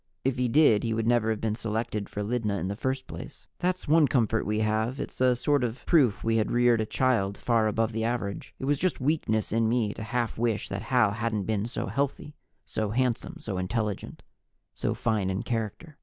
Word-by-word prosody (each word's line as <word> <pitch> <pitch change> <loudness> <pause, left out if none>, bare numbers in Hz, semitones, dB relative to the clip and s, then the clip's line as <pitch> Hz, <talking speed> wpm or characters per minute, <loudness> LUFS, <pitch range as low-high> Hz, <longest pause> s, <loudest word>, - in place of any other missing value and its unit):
If 130 -1 0
he 125 - +2
did, 120 -5 +5
he 115 -1 0
would 115 0 -1
never 120 -1 +3
have 110 -1 0
been 110 -1 0
selected 110 -1 -3
for 105 - -4
Lydna 105 -2 -1
in 95 +1 -2
the 100 - -3
first 130 +4 -2
place. - - -9
That's 180 -1 -1
one 155 0 +5
comfort 115 -4 +1
we 105 +1 0
have 110 +4 0
it's - - -6
a 125 -1 +5
sort 145 +2 +1
of 120 +1 -4
proof 135 - +3
we 115 0 +2
had 110 - +1
reared 120 -1 +3
a 110 - -2
child 110 -7 +1
far 115 -2 +2
above 110 +1 0
the 110 0 -2
average. 115 -4 -3
It - - -5
was 145 0 +1
just 185 - 0
weakness 130 -6 0
in 115 0 +2
me 115 -3 +1
to - - -8
half 115 0 -2
wish 115 -3 0
that - - -3
Hal 125 -5 +4
hadn't 110 -1 -1
been 110 +1 -1
so 120 - -3
healthy, 140 +2 -2 0.3
so 110 -1 -2
handsome, 125 +2 -1
so 95 -4 -4
intelligent, 105 +2 -3 0.5
so - - -2
fine 105 -5 0
in 95 +1 -2
character. 115 +7 -4
115 Hz, 215 wpm, -27 LUFS, 110-125 Hz, 0.5 s, did